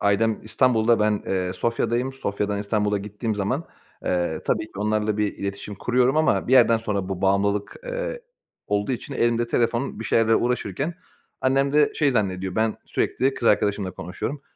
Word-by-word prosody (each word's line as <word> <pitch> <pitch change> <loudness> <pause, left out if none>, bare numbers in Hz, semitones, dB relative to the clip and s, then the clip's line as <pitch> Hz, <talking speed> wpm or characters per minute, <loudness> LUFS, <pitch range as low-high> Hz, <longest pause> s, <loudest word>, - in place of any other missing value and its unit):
ailem 105 +2 +2
İstanbul'da 115 0 +2
ben, 105 -1 +2
eee, 90 -1 -1
Sofya'dayım. 120 +5 -1
Sofya'dan 100 -4 -2
İstanbul'a 105 0 0
gittiğim 105 +2 -4
zaman, 105 +10 -1 0.4
eee, 85 -3 0
tabii - - +1
ki 110 - -16
onlarla 105 +1 0
bir 105 -1 0
iletişim 100 +1 -5
kuruyorum 125 +6 +2
ama 155 -5 +2
bir - - +1
yerden 115 -3 +6
sonra 100 -4 -2
bu 95 -1 -4
bağımlılık, 100 +1 +1
eee, - - -4 0.5
olduğu 105 +5 0
için 140 +3 -5
elimde 120 -1 +1
telefon 120 +2 0
bir 115 - -5
şeylerle 115 0 +3
uğraşırken 125 - -1 0.5
annem 135 +1 +2
de 150 0 +4
şey 145 -2 +2
zannediyor; 95 -5 -1
ben 110 0 +1
sürekli 135 +1 0
kız 115 - +1
arkadaşımla 100 -2 +1
konuşuyorum. 95 - -5
110 Hz, 160 wpm, -24 LUFS, 100-125 Hz, 0.5 s, yerden